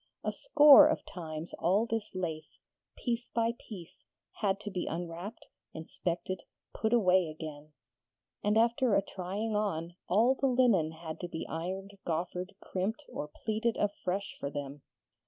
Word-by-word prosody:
A - - 0
score 300 - +8
of 315 - -1
times 160 -2 -6
all 195 +6 +3
this 225 -4 -3
lace, 160 -4 -4 0.4
piece 240 -1 -2
by 230 0 +1
piece, 180 -5 -11 0.3
had 200 -2 0
to 210 - -5
be 180 -2 -3
unwrapped, 175 +6 -5 0.3
inspected, 170 +3 -3 0.3
put 220 - -1
away 185 -6 +4
again; 155 -1 -8 0.7
and 210 +1 +3
after 235 0 +3
a 195 - +3
trying 200 +4 -3
on, 175 -5 -1 0.2
all 225 +8 +5
the 270 +1 0
linen 240 -11 +4
had 160 0 -7
to 175 - -4
be 165 -2 -5
ironed, 190 +4 -5
goffered, 180 +3 -3
crimped, 205 +9 -3
or 150 - -4 0.2
pleated 220 +1 +1
afresh 200 -1 -2
for 140 - -3
them. 145 0 -6
190 Hz, 145 wpm, -31 LUFS, 165-220 Hz, 0.7 s, score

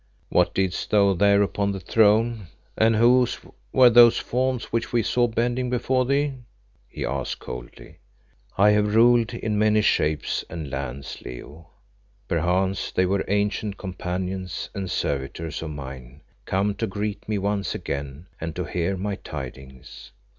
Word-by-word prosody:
"What - - +2
didst 95 -2 -1
thou 100 -2 +4
there 100 +2 +4
upon 100 0 -1
the 95 - -5
throne, 110 +2 +2 0.3
and 110 0 +3
whose 120 +2 +4 0.3
were 125 -2 +6
those 120 0 +7
forms 130 -1 -1
which 115 - -1
we 120 -2 +2
saw 120 +3 +2
bending 120 +2 -1
before 125 +1 0
thee?" 140 +1 +1 0.6
he - - -5
asked 65 0 -3
coldly. - - -10 0.6
"I 105 +2 +6
have 105 0 +2
ruled 120 0 +5
in 110 -3 -2
many 105 0 +3
shapes 75 -6 +1
and 80 -4 -6
lands, 70 0 -5
Leo. 75 +6 -10 0.6
Perchance 90 +3 0
they 95 - +2
were 95 +1 0
ancient 105 0 -1
companions 90 -1 -4
and 95 -2 -4
servitors 70 +1 -3
of 80 - -5
mine 65 -2 -9 0.2
come 100 +2 0
to 100 - -3
greet 105 +2 -4
me 105 - 0
once 100 0 -1
again 70 +3 -5
and 80 -1 -5
to 90 - -2
hear 90 +3 -2
my 100 +1 -3
tidings. 65 -2 -9
100 Hz, 145 wpm, -24 LUFS, 80-110 Hz, 0.6 s, those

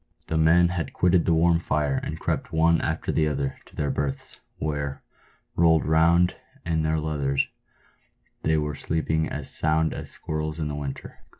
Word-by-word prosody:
The 80 - -3
men 85 +2 +5
had 85 -2 -3
quitted 90 -1 +3
the 85 - +3
warm 85 +1 +3
fire 75 -4 0
and 80 +1 -5
crept - - -2
one 85 0 +3
after - - -2
another 75 -3 -1
to - - -19
their 75 - -1
berths, 70 -1 -4 0.2
where, 70 -2 -3 0.5
rolled 80 -2 +4
round 85 +3 +3 0.3
in 80 -1 0
their 80 0 0
leathers, 70 -3 0 1.0
they 80 0 +1
were 75 -1 -1
sleeping 80 +1 -1
as 75 -2 +2
sound 80 0 +3
as - - -7
squirrels 75 0 -4
in 75 -2 -2
the - - -4
winter. 70 -2 -7
80 Hz, 165 wpm, -25 LUFS, 75-80 Hz, 1.0 s, men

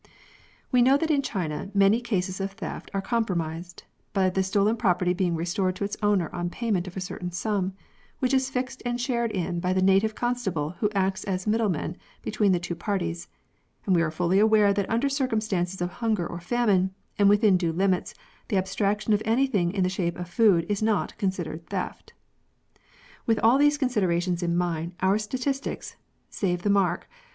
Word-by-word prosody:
We 250 -2 +4
know 265 +3 +5
that 320 +2 0
in 285 -2 +3
China 185 - -3
many 200 +4 +4
cases 190 -5 -2
of 195 0 -3
theft 225 - -7
are 195 -1 -2
com 230 +1 +1
promised, 170 -3 -4 0.3
by 190 -2 +2
the 190 - +1
stolen 200 +3 +2
property 180 -5 +1
being 180 -2 0
restored 180 +3 -1
to 200 - -4
its 200 - -2
owner 205 -5 +2
on 175 0 -2
payment 195 -3 -1
of 180 - -8
a - - -1
certain 180 -1 -5
sum, 190 +1 -1 0.4
which 255 -1 0
is 265 0 +2
fixed 260 0 -3
and 245 0 -2
shared 240 -2 0
in 180 -4 -2
by 180 +1 0
the 185 - +1
native 195 +3 +3
constable 195 -12 -1
who 210 - +2
acts 190 0 0
as 185 -2 -2
middleman 210 -7 0 0.3
between 210 -2 +1
the 180 - +2
two 175 0 -4
parties, 170 - -3 0.6
and 190 - +3
we 170 - +4
are 165 - +1
fully 175 +4 +1
aware 210 -1 +5
that 200 -1 -1
under 235 +5 +1
circumstances 215 -10 -1
of 175 - -3
hunger 215 -4 -1
or 170 - -6
famine, 190 -2 +1 0.2
and 200 -1 +6
within 205 -1 +5
due 175 -2 +1
limits, 185 +2 0 0.3
the 200 - 0
abstraction 200 +3 0
of 210 - +2
anything 225 -6 +2
in 190 -1 0
the - - +2
shape 180 -2 -2
of 180 - -5
food 180 -3 +3
is 205 0 -1
not 215 -1 0
considered 170 -4 -3
theft. 190 -2 -5 1.1
With 225 -1 +3
all 235 +5 +5
these 290 0 +4
considerations 185 - 0
in 170 0 0
mind, 170 -1 -1
our 190 +3 +3
statistics 260 +5 -3 0.3
(save 175 -3 -2
the 205 - +2
mark 195 -2 +1
195 Hz, 185 wpm, -26 LUFS, 180-220 Hz, 1.1 s, and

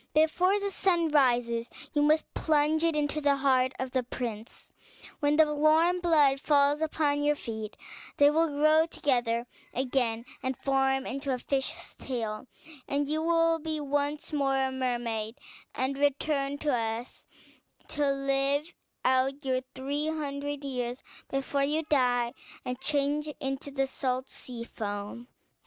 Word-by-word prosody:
Before 360 +6 +3
the 400 0 -2
sun 345 -4 +2
rises 240 -5 +2 0.2
you 295 - +2
must 305 +2 +2
plunge 310 +1 +2
it 330 -2 +2
into 300 0 0
the 285 -1 +3
heart 260 -2 +2
of 260 -1 -4
the 255 - +1
prince; 235 -3 -7 0.5
when 290 0 +2
the 305 -1 +4
warm 315 +4 +4
blood 300 -6 +4
falls 290 0 +3
upon 300 -2 +1
your 295 0 +2
feet 220 -5 -6 0.4
they 285 0 +6
will 325 +2 +3
grow 310 +2 +3
together 240 -7 0 0.3
again, 245 -3 0 0.2
and 260 -1 -2
form 270 -1 +1
into 275 +1 -3
a 255 - 0
fish's 275 +7 -3
tail, 230 -2 -4 0.4
and 285 0 0
you 310 +2 0
will 330 0 +3
be 315 0 -3
once 290 +2 -2
more 275 -2 +1
a 265 0 +1
mermaid, 240 -3 -2 0.4
and 260 +1 0
return 285 0 +1
to 295 -1 0
us 225 +1 -4 0.6
to 290 -1 +1
live 275 +3 0 0.3
out 265 +2 +2
your 255 -1 +1
three 285 +3 -2
hundred 290 -2 -3
years 250 -2 -3 0.3
before 275 +1 -1
you 305 +3 +1
die 245 -5 +2 0.3
and 250 0 -3
change 290 +1 0
into 270 0 -3
the 270 -1 0
salt 260 -1 -2
sea 240 -2 -6
foam. 205 +1 -6
275 Hz, 145 wpm, -29 LUFS, 255-300 Hz, 0.6 s, they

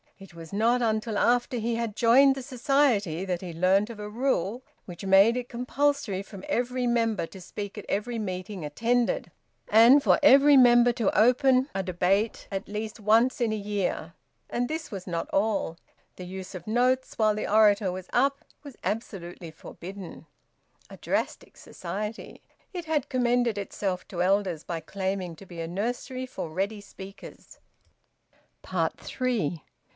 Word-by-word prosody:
It 195 -2 -14
was 165 +2 -11
not 235 +4 +2
until 220 -1 0
after 245 +2 +2
he 230 +1 -1
had 230 -3 -3
joined 265 +4 +5
the 270 - -5
Society 245 - +1
that 180 -2 -2
he 185 - -6
had 165 - -8
learnt 190 +5 +3
of 225 -2 -9
a 210 0 -6
rule 240 -1 -1 0.2
which 180 +2 -9
made 195 +4 +6
it 250 -1 -4
compulsory 250 -4 -1
for 195 -1 -11
every 250 +1 -1
member 230 -5 +1
to 190 - -12
speak 200 +3 -7
at 210 - -7
every 230 +4 -2
meeting 185 -2 -5
attended, 235 +11 0 0.4
and 235 +6 +7
for - - +4
every 285 0 +7
member 240 -1 +6
to 230 -4 0
open 255 +3 +4
a 195 - -1
debate 190 +4 0
at 195 0 -4
least 215 +2 -5
once 225 +6 +3
in 230 -2 +1
a - - 0
year. 200 -5 -3 0.4
And 245 0 -1
this 315 +2 -5
was 195 -3 -6
not 170 -2 -3
all; 195 -5 0 0.4
the 180 - -8
use 185 +1 -8
of 175 +1 -9
notes 250 +3 +1
while 215 -1 +3
the 215 - -3
orator 210 -2 +4
was 185 0 -7
`up' 275 +3 +1 0.2
was 285 -4 -11
absolutely 180 -6 -5
forbidden. 185 +2 -10 0.6
A - - -11
drastic - - -3
Society! 210 +5 -6 0.3
It 350 -2 -5
had 310 -4 -1
commended 245 -4 +1
itself 195 -2 -3
to 175 -2 -3
elders 185 -4 +1
by 170 -2 -4
claiming 190 0 -3
to 195 - -14
be 170 -2 -7
a 165 - -4
nursery 245 +7 -3
for 250 -9 -6
ready 200 +6 -3
speakers. 195 0 -12 1.0
THREE. 215 - -2
215 Hz, 160 wpm, -27 LUFS, 190-245 Hz, 1.0 s, and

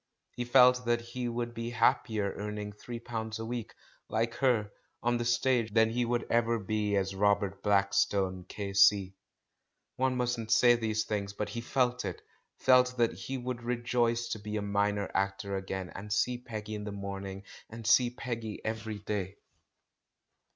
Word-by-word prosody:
He 120 - -4
felt 125 0 +6
that 120 0 +2
he 120 +1 -4
would 120 0 -3
be 115 0 -4
happier 110 -4 +1
earn 105 +1 -4
ing 105 0 -5
three 115 +3 -7
pounds 110 -2 -4
a 115 - -5
week, 120 -1 -5 0.3
like 115 +2 0
her, 115 -6 +2 0.3
on 120 0 +2
the 120 - -2
stage 120 -1 +2
than 110 0 +5
he 120 +1 0
would 120 0 0
ever 115 0 +2
be 105 0 -1
as 95 -1 0
Robert 100 0 +1
Blackstone, 100 -2 +2
K.C. 100 -1 +3 0.8
One 130 0 +1
mustn't 120 -3 -1
say 120 +1 +6
these 110 -2 0
things, 100 -2 -3
but 105 0 -3
he 115 +3 -4
felt 125 0 0
it 95 -4 -5 0.2
— - - -51
felt 125 -1 +5
that 120 -1 +2
he 135 - -5
would 125 -1 -4
rejoice 120 0 0
to 110 - -3
be 105 +1 -4
a 105 - -2
minor 100 0 0
actor 100 +1 -1
again, 95 -1 -4
and 105 +2 -8
see 120 +3 +1
'Peggy 110 -3 -6
in 105 -1 -4
the 105 - -5
morning, 100 -1 -6 0.3
and 115 0 -9
see 120 +2 +5
Peggy 115 -3 -5
every 110 -1 -3
day. 100 -2 -3
110 Hz, 170 wpm, -30 LUFS, 100-120 Hz, 0.8 s, felt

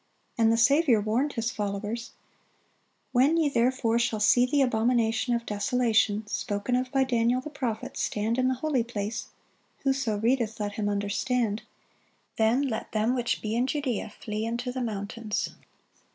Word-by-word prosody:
And 225 -1 +4
the 230 - +3
Saviour 275 0 +4
warned 230 +8 0
His 230 0 -1
followers: 210 +3 -4 1.0
"When 270 +6 +4
ye 315 -3 +3
therefore 235 -2 +1
shall 230 -2 0
see 245 +4 +5
the 280 +2 +3
abomination 235 0 +1
of 235 0 -3
desolation, 220 0 +1
spoken 210 +2 -2
of 255 0 -1
by 270 -1 +3
Daniel 240 -1 +2
the 300 +4 -8
prophet, 240 -6 -4
stand 220 +4 -1
in 255 - +3
the 260 - +1
holy 265 -2 0
place, 220 -1 -4 0.6
(whoso 265 -6 +1
readeth, 230 0 0
let 205 -1 -2
him 205 -1 -2
understand:) 205 +2 -1 0.8
then 225 +5 +3
let 230 -6 -3
them 220 +3 +2
which 245 -2 -1
be 215 +1 -1
in 245 +2 +1
Judea 265 -7 -2
flee 215 0 -3
into 235 +2 -2
the 255 0 -4
mountains." 215 0 -3
230 Hz, 155 wpm, -27 LUFS, 215-255 Hz, 1.0 s, see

